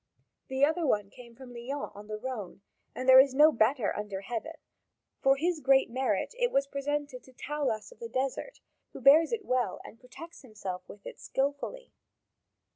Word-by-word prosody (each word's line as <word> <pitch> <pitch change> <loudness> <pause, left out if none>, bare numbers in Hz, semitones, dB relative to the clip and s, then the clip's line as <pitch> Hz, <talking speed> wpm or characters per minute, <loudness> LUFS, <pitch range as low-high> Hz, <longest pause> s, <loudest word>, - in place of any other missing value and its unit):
The 265 +1 +3
other 320 +3 -1 0.3
came 235 -2 -14
from 250 0 -12
Lyons 255 +4 -5
on 205 +1 -12
the 215 0 -5
Rhone, 215 -5 -7 0.3
and 255 - -5
there 260 0 +10
is 265 0 +5
no 300 +3 +7
better 235 -1 +1
under 205 -2 -5
heaven; 240 +10 -5 0.7
for 270 0 +4
his 330 +3 -1
great 270 -3 +3
merit 255 - -1
it 485 0 +2
was 275 0 +2
presented 280 -1 -3
to 260 - -18
Taulas 265 - -3
of - - -17
the 465 -1 -7
Desert, 270 - -3 0.3
who - - -8
bears 290 +5 +6
it 445 -3 -3
well 250 -6 0
and 230 - -12
protects 330 +7 -12
himself 195 -7 -7
with 205 - -13
it - - -9
skilfully. 285 - -3
265 Hz, 175 wpm, -29 LUFS, 235-290 Hz, 0.7 s, there